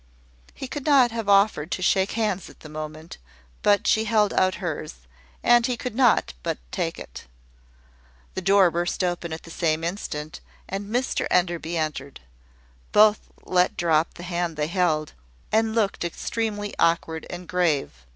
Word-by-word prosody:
He 265 - -6
could 290 +2 -6
not 265 -5 +5
have 225 -3 -3
offered 200 -6 +3
to 185 - -3
shake 190 +2 +2
hands 215 -4 -1
at - - -18
the 155 - -11
moment; 155 +1 -8 0.4
but 205 -1 +3
she 220 0 +3
held 210 -2 +2
out 185 0 +2
hers, 155 -4 -5 0.5
and 240 -1 +5
he 250 -2 -1
could 250 -1 -5
not 245 - +3
but - - -2
take - - -2
it. - - -10 1.1
The 190 - -4
door 195 -1 +5
burst 175 +2 -1
open 175 -2 -2
at 160 - -6
the 165 - -12
same 160 -1 0
instant, 165 -3 -4 0.3
and 195 +1 -4
Mr 250 +3 0
Enderby 170 -1 0
entered. 150 -3 -4 0.7
Both 215 0 +4 0.2
let 180 0 +2
drop 165 -2 +1
the 175 - -9
hand 175 -2 -2
they 150 - 0
held, 170 -4 0 0.4
and 220 0 +2
looked 210 -6 0
extremely 205 +4 -3
awkward 165 -1 +1
and 175 0 -7
grave. 170 -6 +1
180 Hz, 160 wpm, -24 LUFS, 165-210 Hz, 1.1 s, not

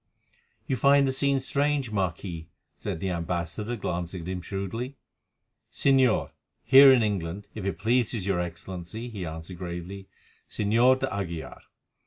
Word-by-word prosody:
"You 130 - -1
find 140 +2 +5
the - - +1
scene 140 0 +1
strange, 140 -2 0
Marquis," 85 -4 -3 0.3
said - - -5
the 95 +2 -2
ambassador, 85 +6 -3
glancing 90 -4 -4
at - - -8
him 90 -1 -3
shrewdly. 100 +8 -4 0.8
"Señor, 130 -4 +3 0.3
here 135 +1 +9
in 125 -3 +5
England, 100 -2 -2
if 105 -3 -6
it 100 - -2
pleases 115 -2 +1
your 95 -3 +1
Excellency," 90 +6 -6
he 100 -7 -5
answered 80 +3 -8
gravely, 90 +2 -6 0.4
"Señor 120 +5 +3
d'Aguilar. 95 -10 -4
100 Hz, 135 wpm, -27 LUFS, 90-125 Hz, 0.8 s, here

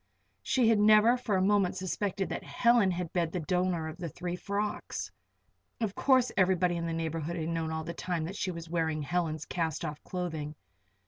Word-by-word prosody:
She 250 -3 +2
had 220 -2 +4
never 215 +3 +6
for 245 -5 -1
a 185 - +2
moment 200 -2 +3
suspected 190 +1 -2
that - - -4
Helen 235 -5 +3
had 180 -2 -3
been 170 -2 +1
the 180 - -3
donor 180 0 0
of 160 +1 -7
the 170 -2 -4
three 175 +3 -4
frocks. 205 +3 -3 0.7
Of 220 -4 -1
course 255 0 +3
everybody 180 -2 +3
in 170 0 -2
the - - -2
neighborhood 165 0 -2
had 160 -1 -2
known 165 -1 -1
all 160 0 -2
the 170 - -5
time 175 -3 -2
that 185 +4 -6
she 195 - -2
was 170 -2 -6
wearing 160 -2 -1
Helen's 155 -1 -1
cast 165 -2 -2
off 150 -1 -6
clothing. 160 -5 -4
180 Hz, 195 wpm, -30 LUFS, 165-195 Hz, 0.7 s, never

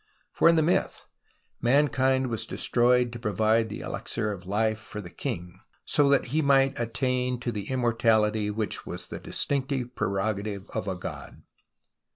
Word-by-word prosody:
For - - +4
in 170 - +5
the 160 - +3
myth 170 - 0 0.6
mankind 130 0 +3
was 115 - -1
destroyed 125 0 +2
to 120 - -6
provide 110 +1 +1
the 105 - -6
elixir 110 -2 -3
of 90 -3 -8
life 110 +2 0
for 105 0 -8
the 90 -4 -8
king 90 -8 -5 0.3
so 145 -1 +3
that 140 -3 +2
he 160 - +3
might 135 -2 +3
attain 125 +1 -1
to 120 - -2
the 105 -3 -5
immortality, 110 -4 +2
which 105 0 -3
was - - -6
the - - -6
distinctive 135 -3 -2
prerogative 100 0 -2
of 95 - -3
a 95 - -1
god. 90 - -8
115 Hz, 160 wpm, -27 LUFS, 105-130 Hz, 0.6 s, in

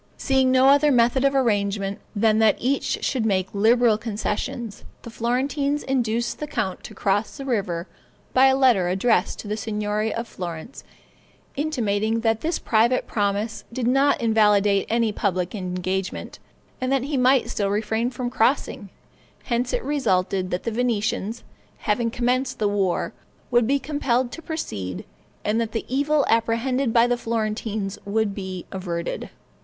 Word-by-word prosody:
Seeing 265 -1 +2
no 260 0 +5
other 285 +1 +5
method 245 +1 +3
of 275 0 +3
arrangement, 200 -5 0 0.2
than 215 +1 +3
that 220 -1 +4
each 265 +3 -1
should 255 -5 0
make 190 -4 0
liberal 225 +1 +4
concessions, 220 0 -4 0.2
the 235 - -8
Florentines 275 +6 -1
induced 235 -3 -1
the 300 - -4
count 190 -9 -3
to - - -10
cross 205 +4 0
the 275 - -6
river 195 -9 -1 0.5
by 260 +1 +6
a 265 0 +3
letter 240 -9 +4
addressed 205 +6 +1
to - - -8
the 210 - -1
Signory 210 0 -2
of 230 +1 -4
Florence, 175 +5 -7 0.7
intimating 225 -7 0
that 225 -1 +1
this 330 +1 0
private 235 +3 +2
promise 205 +1 -1
did 240 0 -3
not 270 +3 +3
invalidate 210 -3 +3
any 230 -1 +2
public 185 -3 -1
engagement, 185 -1 -3 0.4
and 255 +1 -1
that 270 -2 +2
he 285 +2 -2
might 255 0 +4
still 200 -1 -1
refrain 220 +3 0
from 245 -1 -4
crossing; 230 -2 0 0.5
hence 240 0 -1
it - - -1
resulted 190 -9 0
that 180 - -3
the 230 - -2
Venetians, 225 -2 -1 0.3
having 230 +2 0
commenced 255 +2 0
the 210 - +1
war, 195 -3 0 0.4
would 240 -2 +4
be 280 +2 +3
compelled 260 -3 -1
to 330 - -8
proceed, 95 - -5 0.4
and 215 +2 +1
that 225 -2 -3
the 225 - -2
evil 285 +2 +1
apprehended 230 +3 +1
by 230 +1 +5
the 245 0 +1
Florentines 215 -3 -2
would 205 0 0
be 190 -2 -6
averted. 175 -3 -4
225 Hz, 155 wpm, -23 LUFS, 205-255 Hz, 0.7 s, by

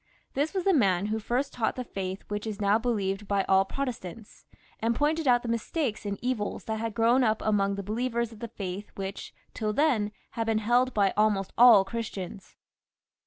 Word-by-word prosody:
This 295 +7 -1
was 375 - 0
the 390 - +3
man 195 - +3
who 215 +1 -1
first 250 +6 -1
taught 230 -3 -1
the 255 - -3
faith 190 -4 -5
which 210 +1 -4
is 210 -2 -5
now 205 +1 +3
believed 205 -4 -1
by 200 -1 +1
all 190 0 +3
Protestants; 230 -4 -6 0.3
and 230 +1 0
pointed 300 +3 +1
out 245 -1 +4
the - - -5
mistakes 230 -1 -2
and 200 0 -2
evils 245 -5 -2
that 220 -1 -3
had 225 -2 -3
grown 235 +4 +4
up 220 -2 +2
among 200 -2 +1
the 200 - -5
believers 235 +2 -1
of 225 - -13
the 235 - -5
faith 200 -2 -6
which, 195 0 -6 0.2
till 215 -1 -2
then, 235 -7 +2 0.2
had 225 -1 -3
been 225 -1 +2
held 240 +4 +2
by 200 -2 +3
almost 205 -2 +1
all 230 -5 +8
Christians. 200 -2 -6
220 Hz, 195 wpm, -28 LUFS, 200-245 Hz, 0.3 s, all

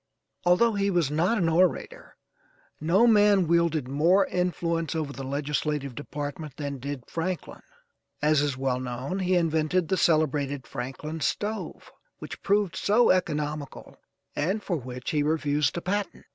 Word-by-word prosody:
Although 200 +6 +4
he 200 -1 +1
was 175 -7 +1
not 175 +9 +2
an 175 -5 +1
orator, 185 - 0 0.6
no 180 +9 +3
man 205 -4 +5
wielded 165 -4 +2
more 170 +8 +3
influence 170 -2 -1
over 150 -3 -2
the 135 - -7
legislative 145 0 -2
department 145 +1 -6
than 140 -2 -4
did 140 -1 -5
Franklin. 175 +2 -4 0.6
As 150 -1 +3
is 145 -3 -1
well 130 -1 0
known, 130 +8 -4
he 185 -1 +1
invented 165 0 +1
the 190 - +1
celebrated 145 -5 +1
Franklin 140 +5 -6
Stove, 210 +7 -3 0.3
which - - -9
proved 200 -2 +1
so 230 +4 +4
economical, 150 -5 -2 0.4
and 190 +8 -1
for 175 - -1
which 125 -2 -6
he 150 - +1
refused 150 -1 +1
a - - -2
patent. 200 +3 -3
160 Hz, 145 wpm, -26 LUFS, 145-185 Hz, 0.6 s, man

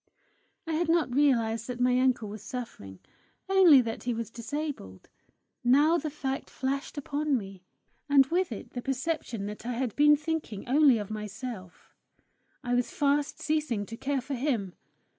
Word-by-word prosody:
I 325 - -3
had 325 +1 0
not 330 -6 +2
realized 230 -5 +2
that 250 -1 -5
my 250 0 +3
uncle 255 -4 +2
was 205 0 -8
suffering 210 - -7 0.5
only 370 -8 +7
that 230 -2 -4
he 245 -1 0
was 230 0 -5
disabled; 235 - -6 0.5
now 290 +7 +4
the 310 - -3
fact 275 -2 -4
flashed 275 +3 -3
upon 290 0 0
me, 195 -4 -8 0.5
and 280 -1 +6
with 350 +2 0
it 215 - -7
the 245 - -5
perception 270 -5 -3
that 210 +1 -7
I 245 +1 -3
had 240 -2 -2
been 295 0 +6
thinking 300 -9 -4
only 275 -1 +5
of 210 -1 -5
myself: 210 -2 -7 0.7
I 245 - -1
was 245 0 +1
fast 285 0 0
ceasing 300 -9 -1
to 225 - -8
care 275 +2 -2
for 270 +3 -6
him! 240 -8 -1
255 Hz, 160 wpm, -28 LUFS, 225-295 Hz, 0.7 s, only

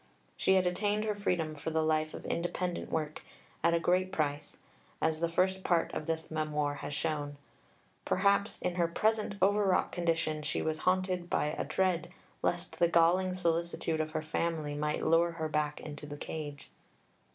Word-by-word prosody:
She 190 - +3
had 185 -1 +4
attained 205 +4 +1
her 215 - +1
freedom 180 -6 -1
for 150 +1 -4
the 160 0 +1
life 155 0 +1
of - - -8
independent 175 +1 -2
work, 155 -1 -2 0.4
at 170 0 +4
a - - +2
great 185 +2 +2
price, 145 -4 -2 0.4
as 160 0 +1
the 170 0 +1
first 190 +2 +1
Part 170 -2 +2
of 155 - -4
this 160 0 -2
Memoir 150 -2 0
has 145 - -5
shown. 145 -2 -2 0.7
Perhaps 200 +2 +2
in 180 0 -1
her 170 -1 +3
present 215 +4 +1
over 205 +2 +4
wrought 190 -2 +2
condition 165 -3 0
she - - -2
was 155 0 -1
haunted 185 -1 0
by 150 - +1
a - - -1
dread 185 -3 0 0.3
lest 175 +1 -1
the 170 - +5
galling 175 +2 +3
solicitude 170 -2 0
of 155 - -2
her 155 - -3
family 155 -1 -1
might 150 +1 -1
lure 170 +1 +4
her 160 -1 -2
back 150 -1 -1
into 145 -1 -7
the 145 0 -7
cage. 145 -2 -6
165 Hz, 175 wpm, -32 LUFS, 155-180 Hz, 0.7 s, the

